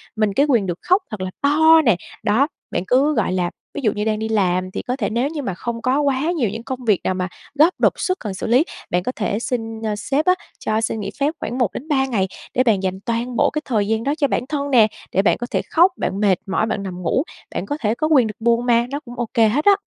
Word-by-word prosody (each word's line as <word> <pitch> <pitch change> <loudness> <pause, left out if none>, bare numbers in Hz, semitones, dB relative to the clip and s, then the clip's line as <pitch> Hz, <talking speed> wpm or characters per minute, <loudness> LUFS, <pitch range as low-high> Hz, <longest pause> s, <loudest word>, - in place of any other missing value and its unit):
mình 215 -2 +1
cái 280 - +3
quyền 230 -7 +3
được 175 -1 -3
khóc 370 +3 +3
thật 215 - -5
là 185 0 -3
to 315 +3 +6
nè. 230 -6 +5 0.3
Đó, 235 +8 +3 0.2
bạn - - -1
cứ, 275 +4 +3
gọi - - +1
là 180 -2 0 0.2
ví 290 - -4
dụ 215 - +2
như 210 +1 -3
đang 215 -1 0
đi 220 0 -3
làm, 185 -3 +1
thì - - -4
có 250 - -3
thể 230 -7 -2
nếu 240 +5 0
như 310 -1 -4
mà 200 -9 -3
không 230 +6 -5
có 260 +4 +1
quá 285 +3 +1
nhiều 235 -8 +1
những 225 +3 -6
công 255 +1 -6
việc 210 -5 +3
nào - - 0
mà 185 0 -2 0.3
gấp, 330 +5 +6
đột - - +4
xuất 370 -1 -1
cần 210 -3 -5
xử 190 - -5
lý, 245 +6 +4 0.3
bạn 180 0 0
có 255 - -1
thể 205 -1 -1
xin, 225 -2 -3
a, 215 -1 -1
sếp 275 +8 -1
á 365 - +5 0.3
cho 215 +1 0
xin 220 - -2
nghỉ 200 - -4
phép 285 +3 +1
khoảng 240 +3 -4
1-3 265 - 0
ngày, 210 -7 0 0.3
để 255 - +3
bạn 210 -6 +2
dành 190 0 -2
toàn 235 +1 -2
bộ - - +3
cái 305 - -3
thời 215 -6 0
gian 225 +1 0
đó 280 - 0
cho 285 - +2
bản 245 - -1
thân 285 -2 -2
nè, 230 -4 +6 0.2
để 195 - +3
bạn 200 - +2
có 240 - -5
thể - - +1
khóc, 350 +4 +5
bạn 195 - -2
mệt 200 -3 +4
mỏi, 195 +2 0
bạn 215 -2 -2
nằm 180 -2 -6
ngủ, 180 - +1 0.3
bạn - - -2
có 290 - -3
thể 215 0 +1
có 310 - 0
quyền 275 -7 +4
được 215 - -5
buồn 235 +1 +2
mà, 235 -1 +3
nó 285 +2 -3
cũng 240 -4 -11
ô 240 - 0
kê 230 -3 +5
hết 275 +8 0
á. 405 - +8
235 Hz, 280 wpm, -21 LUFS, 210-275 Hz, 0.3 s, á